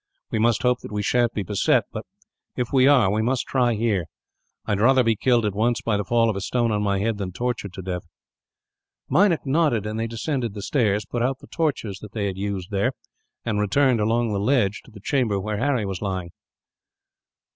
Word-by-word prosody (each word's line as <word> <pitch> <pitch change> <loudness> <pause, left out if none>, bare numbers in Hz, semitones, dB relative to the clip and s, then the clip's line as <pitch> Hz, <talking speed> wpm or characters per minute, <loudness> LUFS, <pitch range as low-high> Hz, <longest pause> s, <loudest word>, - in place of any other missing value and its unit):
We 110 - 0
must 115 -1 +2
hope 125 0 +2
that - - -10
we 105 0 -2
sha'n't 120 +2 +1
be 105 - -1
beset; 100 0 +2
but - - -7 0.5
if 125 +1 -3
we 130 -1 +5
are, 125 -9 +5
we 105 +2 +1
must 125 +3 0
try 120 -3 +1
here. 105 -5 0 0.6
I - - -3
would 100 - +1
rather 130 +3 +5
be 115 -1 +2
killed, 120 +1 +2
at 105 - 0
once, 115 +3 +1
by 115 - +1
the 100 - 0
fall 115 +3 +2
of 110 - 0
a 100 - -3
stone 120 +2 0
on 105 -1 0
my 100 -1 +1
head, 105 +1 -1
than 95 -2 -3
tortured 120 -1 -3
to 95 - -7
death." 90 -1 -3 1.1
Meinik 185 -5 +3
nodded, 135 - +1
and 110 +1 -3
they 115 - -1
descended 115 -1 -3
the 100 - -6
stairs, 105 -5 +1
put 120 0 -3
out 130 +2 0
the - - -15
torches 125 - -2
that 105 -1 -11
they 105 -3 -2
had 95 -2 -2
used 100 -1 -4
there, 100 0 +1 0.5
and 110 -3 0
returned 125 +4 +2
along 115 +1 +1
the 100 - 0
ledge 105 -2 +1
to - - -16
the 105 - -12
chamber 110 -3 0
where 105 +2 -3
Harry 130 -4 +1
was 95 -2 -4
lying. 95 -4 -3
110 Hz, 220 wpm, -23 LUFS, 100-125 Hz, 1.1 s, we